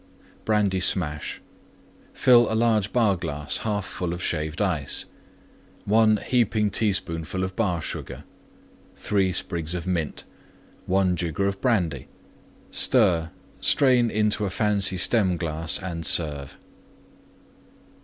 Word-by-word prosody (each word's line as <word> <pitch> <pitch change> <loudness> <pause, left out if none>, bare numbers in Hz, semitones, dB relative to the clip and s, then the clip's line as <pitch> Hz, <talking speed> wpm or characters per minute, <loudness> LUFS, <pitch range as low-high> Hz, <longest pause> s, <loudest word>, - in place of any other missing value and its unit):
BRANDY 105 -3 +1
SMASH 80 -5 +1 0.7
Fill 120 -3 +4
large 110 -3 +1
Bar 110 -6 +2
glass 75 -4 -2
1/2 105 -2 -2
full 85 -2 -4
Shaved 80 -2 -3
Ice. 85 -9 0 0.8
1 110 +1 +4
heaping 110 -4 +1
teaspoonful 95 -3 -1
Bar 95 -5 -2
Sugar. - - -6 0.7
3 95 -2 0
sprigs 85 -2 -1
of 85 - -5
Mint. 85 -5 -3 0.6
1 95 -1 +2
jigger 90 +3 -1
Brandy. 90 - -1 0.6
Stir; 90 -10 +2 0.3
strain 125 -4 +3
into 105 -1 0
fancy 100 -1 0
Stem 95 -2 +2
glass 80 -1 -1
and 85 -3 -6
serve. 75 -5 +1
95 Hz, 100 wpm, -24 LUFS, 85-105 Hz, 0.8 s, Fill